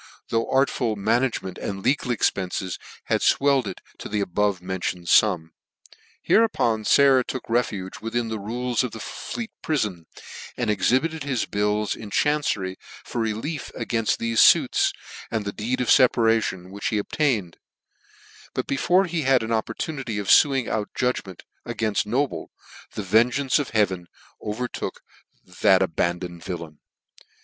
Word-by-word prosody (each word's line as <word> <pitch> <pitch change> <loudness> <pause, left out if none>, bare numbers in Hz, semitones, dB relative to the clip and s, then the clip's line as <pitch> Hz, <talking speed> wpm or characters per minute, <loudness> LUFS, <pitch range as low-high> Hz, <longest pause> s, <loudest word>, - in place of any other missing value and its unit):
though 115 0 0
artful 130 -4 +1
management 110 -2 0
and 95 -1 -5
legal 130 0 +1
expences 95 -5 -1 0.2
had - - 0
fwelled 140 -4 +3
it - - -6 0.2
to - - -7
the - - -12
the - - +1
above 100 0 0
mentioned 90 -1 -4
fum. 80 0 +3 0.7
Hereupon 120 - +2
Sayer 135 0 +5
took 130 +1 -6
refuge 105 -5 -1
within 115 +1 -2
the 110 -1 -4
rules 120 +4 -1
of 125 - -4
the 110 - -7
Fleet 225 - -6
Prifon, 105 - -1 0.5
and 120 -3 0
exhibited 130 +10 +1
his 135 -4 -1
bill 105 +1 0
in 110 - -9
chancery 105 -9 0 0.3
for 120 - -3
relief 115 +7 -3
againft 115 -2 0
thefe 115 -1 0
fuirs, - - +5 0.4
and 110 -2 -2
the 100 - -3
deed 120 +4 -2
of 125 - -1
feparation, 115 -7 +3
which 100 +1 -4
he 110 - 0
obtained; 105 - -1 1.0
but - - -1
be 140 - -2
fore 185 +7 +3
he 170 -2 -2
had 135 -3 +3
an 110 - -4
opportunity 115 +2 -2
of 100 -1 -3
luing 135 -5 -2
out 105 -2 -2
judg 125 0 0
ment 95 -2 -11 0.2
againft 105 -2 -1
Noble, 135 +6 -1 0.5
the 105 - -3
vengeance 120 +8 +3
of 145 - -2
heaven 95 -5 0 0.3
overtook 120 +4 -4 0.6
that 95 -1 +5
abandoned 85 0 -2
villain. 85 -4 -6
110 Hz, 145 wpm, -24 LUFS, 100-130 Hz, 1.0 s, Sayer